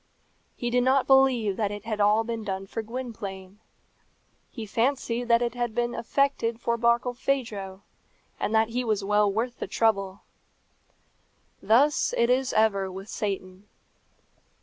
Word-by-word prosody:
He 240 0 -3
did 250 +1 +3
not 260 +1 +3
believe 260 -7 +3
that 210 -3 0
it 205 +1 -7
had 215 -2 -3
all 210 +2 +4
been 230 -1 -4
done 195 -1 -4
for 225 +3 -5
Gwynplaine. 210 -5 -7 0.9
He 225 -3 -7
fancied 240 +2 -1
that 235 0 +3
it 235 -1 -2
had 240 -2 -3
been 240 0 0
effected 235 -1 0
for 235 0 0
Barkilphedro, 235 -4 -1 0.6
and 220 - -1
that 220 0 +3
he 245 +2 -2
was 215 -4 -1
well 210 0 +2
worth 235 +4 -3
the - - -4
trouble. 200 -3 0 1.4
Thus 275 +7 +3
it 235 +1 +3
is 260 +1 +1
ever 200 -3 +2
with 195 +3 -9
Satan. 195 -1 -5
225 Hz, 145 wpm, -26 LUFS, 205-240 Hz, 1.4 s, all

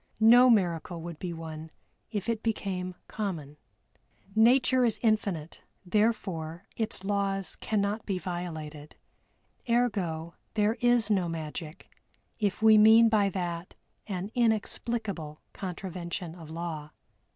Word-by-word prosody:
No 240 +3 +8
miracle 175 -5 +1
would 170 -2 -7
be 180 - -4
one 160 -1 -7 0.4
if 205 -2 -3
it 230 -2 -1
became 185 -5 -2
common. 165 -9 -4 0.8
Nature 250 +3 +5
is 230 -3 +2
infinite, 200 -8 0 0.2
therefore 185 -4 -1
its 220 -4 -2
laws 195 -1 -1
cannot 210 0 -1
be 195 -3 0
violated 160 -5 -6 0.7
ergo, 185 -9 0 0.2
there 210 0 +3
is 240 -3 +3
no 185 -4 +2
magic 160 -1 -7 0.5
if 205 0 -1
we 220 -1 +8
mean 225 +2 +8
by 210 -3 +3
that 175 -2 -4 0.3
an 195 0 -4
inexplicable 220 -7 -1
contravention 180 -2 -5
of 165 -3 -11
law. 160 -2 -5
195 Hz, 115 wpm, -29 LUFS, 170-220 Hz, 0.8 s, No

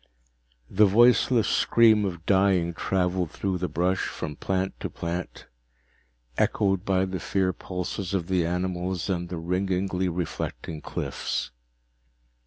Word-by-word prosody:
The 105 +2 +4
voiceless 120 +2 +4
scream 110 -3 +4
of 85 -4 -5
dying 95 -3 +3
traveled 90 -1 0
through 95 +2 -2
the 90 - -1
brush, 90 +5 0
from 75 - -5
plant 95 +4 -2
to - - -4
plant, 85 +1 -5 0.9
echoed 95 -2 +1
by 95 -2 +2
the 95 -1 -4
fear 95 +1 0
pulses 90 +1 -4
of 90 -3 -1
the 95 -2 +1
animals 90 +1 -2
and 90 -1 -2
the 90 - -4
ringingly 90 +2 -1
reflecting 85 -2 -4
cliffs. - - -3
95 Hz, 125 wpm, -26 LUFS, 90-95 Hz, 0.9 s, The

